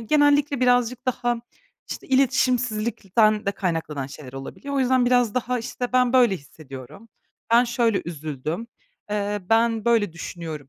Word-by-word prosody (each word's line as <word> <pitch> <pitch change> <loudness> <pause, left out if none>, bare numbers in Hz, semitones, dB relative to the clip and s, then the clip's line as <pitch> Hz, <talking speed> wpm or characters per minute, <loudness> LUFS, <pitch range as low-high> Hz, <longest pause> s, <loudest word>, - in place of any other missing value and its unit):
genellikle 290 +2 +3
birazcık 245 0 +2
daha, 240 -1 0 0.5
işte, - - -6
iletişimsizlikten 235 -5 +2
de 200 - +1
kaynaklanan 165 -8 -3
şeyler 135 -2 -11
olabiliyor. 135 - -7
O 275 - +1
yüzden 255 -1 +3
biraz 245 -3 +3
daha, 250 0 -1
işte, 245 +1 -5
"Ben 250 -1 +3
böyle 240 -6 +4
hissediyorum, 140 - -12 0.4
ben 240 +1 +6
şöyle 235 -3 +1
üzüldüm, 155 - -5 0.4
eee, 205 0 -1
ben 225 -1 +3
böyle 225 -7 +2
düşünüyorum" 160 -4 -7
230 Hz, 135 wpm, -23 LUFS, 175-250 Hz, 0.5 s, ben